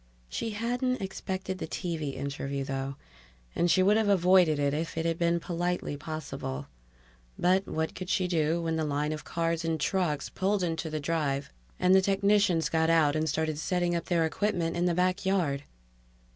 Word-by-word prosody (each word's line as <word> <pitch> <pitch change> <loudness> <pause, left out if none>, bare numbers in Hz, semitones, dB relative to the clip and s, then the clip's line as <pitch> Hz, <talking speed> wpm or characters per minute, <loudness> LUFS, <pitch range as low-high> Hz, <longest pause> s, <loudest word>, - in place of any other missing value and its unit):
She 225 - -3
hadn't 245 +3 0
expected 190 -1 -4
the - - -4
TV 160 -6 -3
interview, 140 0 -3
though, 135 0 -3 0.6
and 175 - +2
she 185 +2 +4
would 205 +3 +5
have 220 -2 +2
avoided 180 -4 +5
it 140 -1 +1
if 160 +2 -3
it 165 - -1
had 165 0 0
been 170 0 +2
politely 175 -2 -2
possible. 145 - -5 0.7
But 185 +2 +2
what 160 0 -2
could 185 -1 -7
she 185 -2 +1
do 165 -1 +1
when 165 -1 -1
the 160 - 0
line 150 0 -1
of 155 0 -5
cars 165 0 -1
and 165 -1 -1
trucks 155 -2 0
pulled 195 0 0
into 165 -1 -2
the 155 0 -3
drive 145 -3 -1 0.3
and 185 - +4
the 190 - +7
technicians 195 -3 +3
got 160 0 +1
out 160 -3 +4
and 155 0 0
started 155 -1 -1
setting 175 +1 0
up 170 - -2
their 170 -3 +2
equipment 170 -1 -1
in 175 +1 +1
the 175 -1 +2
backyard? 180 -5 +1
165 Hz, 180 wpm, -29 LUFS, 155-185 Hz, 0.7 s, the